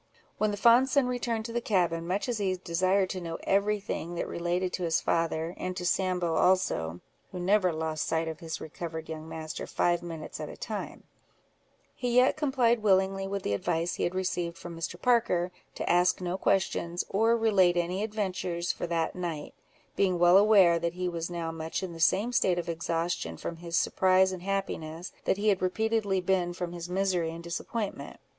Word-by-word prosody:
When 215 - +2
the 205 - -3
fond 240 +4 +5
son 280 -1 +3
returned 240 -3 -2
to 230 - -6
the 240 - 0
cabin, 170 -6 0
much 195 +6 -1
as 240 -3 -1
he 190 -2 0
desired 185 +2 +1
to 185 - -4
know 165 -1 -4
every 205 +2 +2
thing 175 -3 -5
that - - -2
related 175 +2 -1
to 180 - -2
his 165 -1 +2
father, 165 0 0
and 185 0 -4
to 180 - -4
Sambo 180 -2 +1
also 90 - +1 0.3
(who 180 - -6
never 185 0 +3
lost 160 -1 -2
sight 160 0 0
of 160 -1 -5
his 165 -2 -5
recovered 160 0 -6
young 160 0 -6
master 160 0 -6
five 175 -1 +1
minutes 165 -3 -7
at - - -5
a - - -10
time), - - -6 0.9
he 245 -2 -2
yet 250 +1 +5
complied 255 -6 +2
willingly 195 -1 +2
with 200 0 -3
the 100 - -1
advice 165 - -1
he - - -3
had 175 - -1
received 175 -2 -2
from 175 -1 -8
Mr. 165 +1 -5
Parker, 205 -8 +2 0.2
to - - -4
ask 180 +1 +3
no 180 0 -2
questions, 175 -3 0
or 225 +4 +3
relate 195 -6 +3
any 175 +3 0
adventures 185 -5 -2
for - - -5
that 165 -1 -1
night, 170 -5 -4 0.4
being 185 -3 +2
well 175 +1 +6
aware 195 -5 +6
that 170 0 -1
he 180 0 -2
was 170 -1 -3
now 170 -2 -3
much 165 +2 -4
in 180 -2 -5
the 165 - -10
same 205 +8 +3
state 185 -7 +2
of 175 - -3
exhaustion 165 - -2
from 165 - -5
his 170 0 -3
surprise 190 0 +3
and 185 -2 -6
happiness, 180 -3 -3
that - - +2
he 210 +1 +2
had 195 -2 +2
repeatedly 205 +1 +1
been 180 -1 0
from 175 -1 -4
his 175 0 -6
misery 180 -3 0
and 165 +1 -7
disappointment. 195 +5 -4
180 Hz, 195 wpm, -29 LUFS, 170-195 Hz, 0.9 s, well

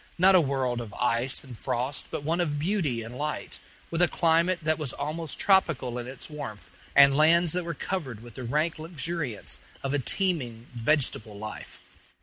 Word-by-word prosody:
not 185 +2 +6
a 185 - +7
world 130 -4 -1
of 110 -3 -8
ice 125 +1 +1
and 130 -3 -10
frost, 125 +4 -2
but - - -4
one 165 +4 +1
of 150 -4 0
beauty 150 - 0
and 115 +2 -9
light, 150 +1 -3 0.3
with 165 +1 0
a 175 - +6
climate 170 +2 +3
that 155 +1 +1
was 145 -5 -2
almost 155 +1 -3
tropical 155 -11 +2
in 120 - -6
its 130 0 -7
warmth, 110 - -8 0.2
and 140 -1 +8
lands 165 +3 +5
that 180 0 0
were 170 -2 -3
covered 135 - -4
with 120 -2 -11
the 130 - -7
rank 150 +7 0
luxuriance 160 - -3 0.2
of 135 0 -1
a 145 - +2
teeming 130 - +1
vegetable 120 -4 0
life. 110 +1 -8
145 Hz, 180 wpm, -27 LUFS, 125-165 Hz, 0.3 s, and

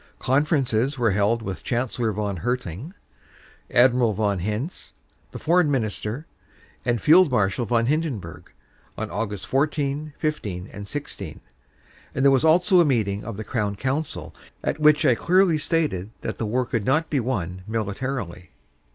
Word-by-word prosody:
"Conferences 135 -2 +1
were 115 -4 +2
held 105 +4 +1
with 95 -3 -5
Chancellor 120 -2 -1
von 100 -2 -2
Hertling, 125 - -4 0.7
Admiral 120 -3 +4
von 100 -2 0
Hintz, 105 - -4 0.4
the - - -7
foreign 170 0 +3
minister, 115 +1 -2 0.6
and 120 -2 +1
Field 165 - +6
Marshal 110 -1 +1
von 115 -1 +2
Hindenburg, 130 - -3 0.5
on - - -3
Aug. 105 -3 -3
14, 145 +1 -1
15 105 - -3
and 100 0 -8
16, 100 - -6 0.8
and 135 - +1
there 140 - +7
was 135 -2 +3
also 180 +4 +5
a - - +7
meeting 110 -9 0
of 110 -2 -6
the 110 - -4
Crown 105 -3 -2
Council 135 +8 -3 0.3
at - - -1
which 150 0 +5
I 130 - +6
clearly 175 +4 +3
stated 150 - 0
that - - -5
the 110 - -1
war 125 +4 0
could 115 -3 -2
not 155 +7 +1
be 145 - +2
won 95 -8 -3
militarily." 110 -4 -4
125 Hz, 150 wpm, -24 LUFS, 105-150 Hz, 0.8 s, there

